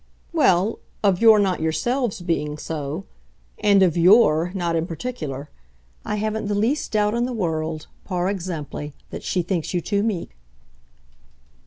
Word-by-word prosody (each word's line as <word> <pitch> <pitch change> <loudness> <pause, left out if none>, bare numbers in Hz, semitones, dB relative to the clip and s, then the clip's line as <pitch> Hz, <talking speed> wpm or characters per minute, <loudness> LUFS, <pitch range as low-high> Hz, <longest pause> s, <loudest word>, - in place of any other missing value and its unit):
"Well, 210 - +3 0.2
of 195 -3 +3
your 225 -2 +8
not 195 -3 +1
yourselves 195 - -1
being 150 -4 -1
so 155 +3 -5 0.5
and 200 -2 +5
of 175 -4 +3
YOUR 175 -2 +5
not 170 -3 -1
in 165 +1 0
particular. 155 - -5 0.5
I 210 - -2
haven't 215 0 -2
the 205 - 0
least 230 +9 0
doubt 210 0 +2
in 235 +1 +1
the 250 - -3
world, 160 -6 -2 0.2
par 180 -2 -1
exemple, 165 -6 -4 0.2
that - - -6
she 180 - -1
thinks 175 0 -2
you - - +2
too 200 +3 0
meek." 195 - -2
185 Hz, 150 wpm, -23 LUFS, 160-210 Hz, 0.5 s, your